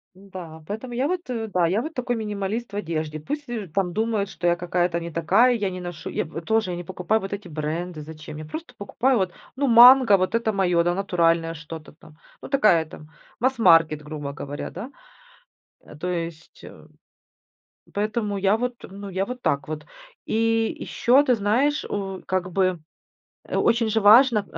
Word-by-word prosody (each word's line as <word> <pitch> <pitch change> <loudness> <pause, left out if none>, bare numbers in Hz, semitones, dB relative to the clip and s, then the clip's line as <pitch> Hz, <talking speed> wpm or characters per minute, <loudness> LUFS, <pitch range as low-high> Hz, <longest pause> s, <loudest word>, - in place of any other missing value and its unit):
Н-да, 185 -5 -10
поэтому 230 +4 -6
я 260 +4 0
вот, 360 0 -1
э, 225 -2 -3
да, 180 -4 +1
я 200 +6 +1
вот 320 +3 -6
такой 245 -2 -2
минималист 210 +1 -4
в - - -5
одежде. 155 -5 -3
Пусть 295 - -4 0.3
там 185 -3 0
думают, 220 -2 0
что 175 - -7
я 175 - +4
какая-то 175 -1 0
не 170 0 -6
такая, 200 +10 +3
я 205 -3 -1
не 185 0 -6
ношу 175 -2 -7
Я - - -2
во 165 +2 -7
тоже 220 -1 0
я 175 - -4
не 175 - -6
покупаю 185 +5 -1
вот 195 - -6
эти 200 -2 -6
бренды. 155 +1 -4
Зачем? 155 0 -10
Я 155 - -7
просто 320 - -8
покупаю 245 +5 +1
вот, 185 -2 0 0.2
ну, 280 +1 0
"Манго", 240 -2 +8
вот 185 +5 -1
это 230 -1 +1
моё, 180 -4 +2
да, 175 0 +1
натуральное 170 -4 +1
что-то 160 -1 -10
там. 155 0 -19 0.2
Ну, - - -9
такая 210 - +4
там, 155 -1 -13 0.3
масс-маркет, 165 - +4
грубо 150 -2 -6
говоря, 145 0 -6
да. 255 +6 -8 0.9
Э, - - -14
то 175 +4 -4
есть, 165 -2 -6
э, - - -13 1.1
поэтому 210 0 -1
я 200 +2 +3
вот, 245 +1 -2
ну, 200 +1 -9
я 190 +1 -1
вот 250 0 -7
так 140 0 0
вот. 155 -1 -5 0.4
И 225 0 +1
ещё, 255 +4 +3
ты 250 - +3
знаешь, 240 +8 +1
у, 195 -2 -4
как 185 -1 -2
бы, 185 -1 +1 0.7
э, - - -6
очень 230 -1 +2
же 220 +1 +2
важно, 220 +1 +6
195 Hz, 185 wpm, -24 LUFS, 170-225 Hz, 1.1 s, Манго